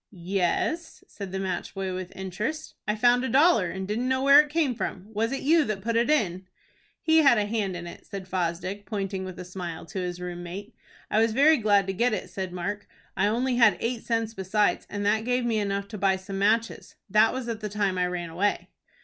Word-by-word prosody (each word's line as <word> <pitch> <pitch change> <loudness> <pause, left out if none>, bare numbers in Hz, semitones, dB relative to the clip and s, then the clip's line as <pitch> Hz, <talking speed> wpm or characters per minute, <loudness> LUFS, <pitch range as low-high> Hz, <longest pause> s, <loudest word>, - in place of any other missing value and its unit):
"Yes," 195 - -2
said 200 -3 -8
the 190 - -3
match 190 0 -3
boy 190 -1 -3
with 185 -1 -5
interest. 210 - -4
"I 210 - +1
found 245 +3 +4
a 260 - -1
dollar, 275 - +4
and 190 +2 -5
didn't 235 +5 -1
know 260 0 +1
where 280 +2 +8
it 300 - -6
came 300 -4 +1
from. 190 -3 -4
Was 225 +2 0
it 275 - -3
you 320 +3 +4
that 200 -3 -3
put 230 +1 -1
it 235 +4 +2
in?" 190 - +1 0.6
"He 320 0 +5
had 275 -6 +6
a 210 - +1
hand 205 -3 -2
in 175 - -7
it," 170 - -11
said 195 -3 -7
Fosdick, 185 +2 -3
pointing 195 -3 -3
with 185 -1 -8
a 180 - -7
smile 175 -3 -6
to 170 +4 -6
his 180 -1 -4
room 175 -1 -5
mate. 195 +6 -8 0.4
"I 215 - +3
was 225 -1 +2
very 300 +5 +5
glad 205 -4 +3
to 195 - -2
get 235 +4 +1
it," - - -4
said 190 -2 -4
Mark. 200 +4 -4 0.3
"I - - +2
only 245 +3 0
had 215 -7 +5
eight 235 0 -2
cents 225 -1 -1
besides, 205 +1 0
and 205 0 -3
that 215 +2 +2
gave 250 +1 0
me 225 -2 +1
enough 200 -1 -2
to 210 - -7
buy 190 0 +3
some 195 +1 -6
matches. 225 +3 0
That 215 +2 +4
was 255 -1 -4
at 230 -2 -3
the 210 -1 -4
time 200 -3 0
I 180 - +2
ran 175 -2 -4
away." 200 +5 -1
205 Hz, 230 wpm, -26 LUFS, 185-235 Hz, 0.6 s, where